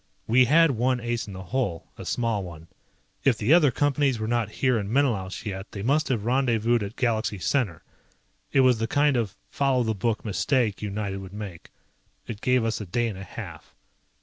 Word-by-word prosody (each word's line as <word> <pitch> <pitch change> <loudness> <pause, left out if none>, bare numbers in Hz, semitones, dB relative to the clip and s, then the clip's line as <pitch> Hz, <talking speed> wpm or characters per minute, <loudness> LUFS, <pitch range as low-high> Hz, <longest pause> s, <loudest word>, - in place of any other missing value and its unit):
We 125 +3 +5
had 160 +4 +5
one 125 +1 +1
ace 120 -1 -3
in 100 - -8
the 95 0 -7
hole, 100 -5 -3
a - - -9
small 115 -4 -1
one. 85 -3 -9 0.6
If 125 -5 +3
the 110 +9 +3
other 165 -5 +6
Companies 140 0 +1
were 110 0 -3
not 120 -2 0
here 125 -3 +4
in 100 0 -4
Menelaus 115 -8 0
yet, 95 -1 -6
they 100 - -5
must 145 +5 +2
have 115 -5 -1
rendezvoused 120 -2 +2
at 100 +1 -5
Galaxy 110 -4 0
Center. 100 - -1 0.7
It 135 - +4
was 125 -3 +4
the 115 - 0
kind 145 +2 +2
of 110 -5 -1 0.2
"follow 135 -3 +2
the 110 -1 0
book" 110 +3 -2
mistake 110 0 0
United 100 -1 -3
would 95 -1 -9
make. 100 -5 -8 0.6
It 105 -1 -7
gave 125 -2 +2
us 115 -1 -1
a 105 - -7
day 120 +6 0
and 100 - -7
a - - -6
half. - - -9
115 Hz, 200 wpm, -26 LUFS, 100-130 Hz, 0.7 s, other